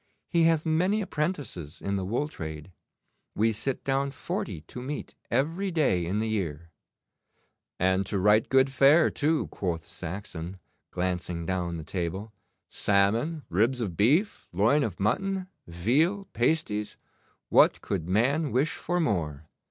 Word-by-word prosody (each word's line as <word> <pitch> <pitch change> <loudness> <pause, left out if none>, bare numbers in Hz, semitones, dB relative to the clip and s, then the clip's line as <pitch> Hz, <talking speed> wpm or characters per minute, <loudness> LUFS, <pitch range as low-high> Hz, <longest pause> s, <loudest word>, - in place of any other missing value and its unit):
He 170 -1 +3
hath 165 -2 +3
many 180 +6 +2
apprentices 145 - -3
in 100 0 -2
the 95 - -1
wool 120 +10 -1
trade. 80 - -7 0.6
We 115 +2 +3
sit 115 +5 -2
down 135 +1 +1
forty 100 - -4
to 105 +11 -9
meat 145 +4 -5 0.2
every 165 +8 0
day 135 - +1
in 95 +4 -1
the 110 +1 0
year.' 85 -7 -3 1.1
'And 95 +1 +2
to 100 - -1
right 105 +3 +4
good 135 0 +4
fare, 140 +5 +5
too,' 155 +1 +1
quoth 85 -4 -3
Saxon, 90 0 -6 0.3
glancing 90 -2 -2
down 90 -1 -2
the 80 - -6
table. 95 +6 -4 0.3
'Salmon, 115 +11 +1
ribs 115 +8 +2
of 100 -8 -3
beef, 150 - +2
loin 110 - +3
of 110 -10 -2
mutton, 190 - 0 0.2
veal, 140 - +1
pasties 120 -6 0 0.5
what - - +5
could 90 -3 -3
man 140 - +2
wish 135 +6 +2
for 175 +2 -2
more? 80 - -1
110 Hz, 140 wpm, -28 LUFS, 90-150 Hz, 1.1 s, fare